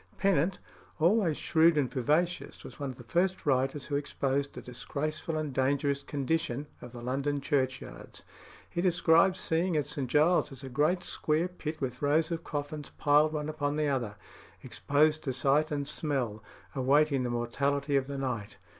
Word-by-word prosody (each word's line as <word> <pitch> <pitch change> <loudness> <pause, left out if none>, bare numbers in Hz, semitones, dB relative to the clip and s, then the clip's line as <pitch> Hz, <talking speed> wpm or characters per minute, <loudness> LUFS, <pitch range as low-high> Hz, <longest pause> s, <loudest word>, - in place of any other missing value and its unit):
Pennant, 190 -2 +2 0.4
always 170 -1 +3
shrewd 165 0 +4
and 140 -3 +2
vivacious, 150 +7 0
was - - -11
one 140 -1 -3
of 130 - -7
the 125 - -12
first 180 +10 0
writers 135 0 +1
who 145 - -3
exposed 140 -1 -1
the - - -7
disgraceful 155 +5 -4
and 155 -3 -3
dangerous 140 +1 +1
condition 145 -1 -2 0.2
of 125 - -9
the 120 -1 -9
London 140 +3 -1
churchyards. 135 -3 -3 0.4
He 175 - -3
describes 175 +1 +4
seeing 165 +1 +1
at 150 - +1
St 140 -3 -3
Giles's 150 -3 +2
a 135 - -6
great 150 +8 +1
square 155 +3 0
pit 160 -3 -6
with 125 -2 -3
rows 155 +4 +2
of 165 0 -3
coffins 145 0 -5
piled 150 +2 +4
one 150 -1 -2
upon 150 -2 -2
the 150 -1 +1
other, 120 -7 -1 0.5
exposed 145 +6 +1
to 130 - -1
sight 140 +4 +2
and 145 -2 -2
smell, 125 -10 -1 0.3
awaiting 140 +1 +3
the 125 - -1
mortality 140 +4 0
of 135 -1 +2
the 140 0 -4
night. 120 -6 -3
145 Hz, 165 wpm, -30 LUFS, 135-155 Hz, 0.5 s, shrewd